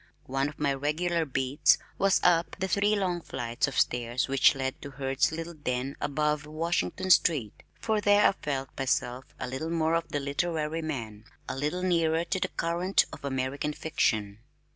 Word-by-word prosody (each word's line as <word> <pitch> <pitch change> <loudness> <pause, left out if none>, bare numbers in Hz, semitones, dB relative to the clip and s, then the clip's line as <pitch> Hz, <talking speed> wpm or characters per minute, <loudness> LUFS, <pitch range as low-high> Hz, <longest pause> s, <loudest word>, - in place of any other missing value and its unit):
One 135 +2 -1
of 150 - -13
my 145 -2 +1
regular 160 +4 0
"beats" 135 +2 +3 0.2
was 195 -1 +4
up 170 -1 +3
the 190 - 0
three 205 +3 +2
long 180 -4 -1
flights 120 -3 -2
of 135 - -5
stairs 120 +1 0
which 135 +1 +4
led 130 -1 -3
to 140 - -7
Hurd's 135 +1 0
little 165 +1 -5
den 135 -3 -3
above 150 0 0
Washington 170 +4 -1
Street, 145 - +3 0.2
for 220 -2 0
there 205 0 +5
I - - +4
felt 135 -7 -4
myself 130 -1 -1
a - - -3
little 130 +6 -4
more 165 -1 +1
of 165 0 0
the 145 - -2
literary 155 +2 -1
man, 115 -9 -5 0.2
a - - -3
little 150 +7 -2
nearer 165 -2 +2
the 185 +2 -1 0.2
current 175 +3 +2
of - - -10
American 140 +2 -2
fiction. 110 -10 -1
150 Hz, 170 wpm, -28 LUFS, 135-170 Hz, 0.2 s, there